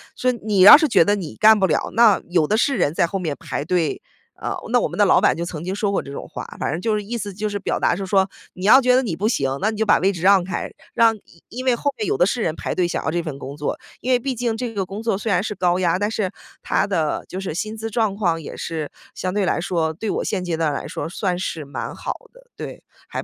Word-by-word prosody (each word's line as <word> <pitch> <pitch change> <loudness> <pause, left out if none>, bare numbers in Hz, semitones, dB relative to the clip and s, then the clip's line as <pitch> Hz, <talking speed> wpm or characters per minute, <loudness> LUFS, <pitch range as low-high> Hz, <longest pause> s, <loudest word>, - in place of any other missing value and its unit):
说 255 - +1
你 215 -4 -2
要 190 +8 +11
是 310 0 +2
觉 230 - +5
得 205 +4 +2
你 180 -7 -6
干 220 0 +6
不 190 - +3
了， 155 - 0
那 225 -3 +5
有 175 -3 +3
的 210 - +1
是 270 +3 +2
人 155 -5 +1
在 170 - +2
后 195 - -3
面 160 -6 -3
排 145 - -4
队。 170 -2 0 0.3
呃， - - -4 0.2
那 - - +5
我 - - 0
们 - - -8
的 - - +5
老 - - +4
板 - - +4
就 170 - -2
曾 160 -2 -6
经 185 +2 -3
说 205 -1 0
过 200 - 0
这 140 - -10
种 - - -7
话， - - -7 0.2
反 - - -1
正 160 +4 -3
就 225 -2 +1
是 210 - -2
意 225 +4 -5
思 205 -3 -4
就 210 +3 -3
是 205 -1 -3
表 195 - -2
达 - - +2
是 195 +2 -5
说， 190 0 +3 0.3
你 185 - -6
要 265 +6 +8
觉 250 0 +4
得 260 - +3
你 195 -10 -2
不 200 +6 -1
行， 135 - 0
那 210 - +2
你 220 - -4
就 220 - +1
把 210 - +4
位 195 +2 +2
置 175 -3 -7
让 190 -1 +6
开， 185 - -3 0.3
让 230 -2 +5
因 185 -5 -20
因 250 +3 -6
为 255 -2 +3
后 285 +3 -1
面 215 - -3
有 - - 0
的 175 - +4
是 230 +5 -1
人 160 -6 -1
排 - - -3
队 180 -1 +1
想 - - -3
要 160 - 0
这 175 - 0
份 155 -5 -6
工 140 +1 -8
作， 150 -1 -3 0.2
因 255 - -2
为 250 - +5
毕 265 +2 -3
竟 235 -2 -2
这 240 -1 -4
个 200 -3 -1
工 195 +4 -7
作 225 -3 +1
虽 210 +2 -2
然 190 - +2
是 210 - -3
高 180 -3 +1
压， 180 0 +1
但 205 - 0
是 210 -4 -2 0.3
它 - - +1
的 165 -6 -1
就 185 - -5
是 190 -4 -4
薪 215 +6 -4
资 225 +1 -5
状 220 -3 0
况 170 -5 0
也 - - -8
是 160 -3 -4 0.2
相 185 - -3
对 205 0 0
来 175 - 0
说， 165 -3 -1
对 215 +7 -4
我 - - -1
现 190 -4 -2
阶 170 -2 -2
段 160 -2 0
来 140 - -4
说， - - -4
算 180 +1 -2
是 165 -3 -4
蛮 140 0 -6
好 - - -4 0.2
的， - - -19
对， - - -8 0.2
还 - - -5
195 Hz, 320 characters per minute, -21 LUFS, 170-220 Hz, 0.3 s, 要